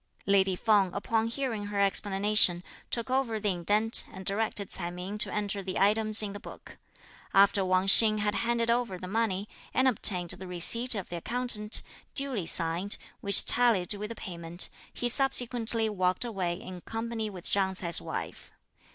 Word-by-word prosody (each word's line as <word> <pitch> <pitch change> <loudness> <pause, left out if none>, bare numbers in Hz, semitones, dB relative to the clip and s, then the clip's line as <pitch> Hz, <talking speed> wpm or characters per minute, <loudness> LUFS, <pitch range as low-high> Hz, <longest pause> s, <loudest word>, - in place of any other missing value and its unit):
Lady 195 -1 +2
Feng, 200 -2 +1
upon 220 +2 -1
hearing 230 -4 -4
her 205 -1 -4
explanation, 200 -2 +2 0.3
took 235 +1 -4
over 255 -4 -1
the 210 - -2
indent, 205 +6 +1
and 190 -1 -11
directed 200 0 -3
Ts'ai 170 - -2
Ming 185 +4 -8
to - - -1
enter 205 -1 -3
the 185 -1 -6
items 215 +2 +2
in 200 -1 -5
the 205 - -8
book. - - -14 0.6
After 200 0 +4
Wang 185 0 0
Hsing 215 +2 +7
had 210 0 -1
handed 235 0 -1
over 235 -6 -2
the 185 - -9
money, 205 -1 -2 0.3
and 260 +1 +2
obtained 185 -7 +2
the 190 - -8
receipt 230 +8 +5
of 195 -3 -6
the 175 - -6
accountant, 225 +1 +1 0.3
duly 265 - +1
signed, 170 +5 +3 0.2
which 200 0 +4
tallied 225 -7 +3
with 210 +1 -7
the 230 - -8
payment, 170 -3 -1 0.2
he 245 - -4
subsequently 240 -3 +1
walked 185 +1 -2
away 190 -7 -3
in 180 -1 -10
company 225 0 -5
with 185 -3 -11
Chang 190 -1 0
Ts'ai's 170 -3 +3
wife. - - -8
205 Hz, 170 wpm, -27 LUFS, 185-225 Hz, 0.6 s, Hsing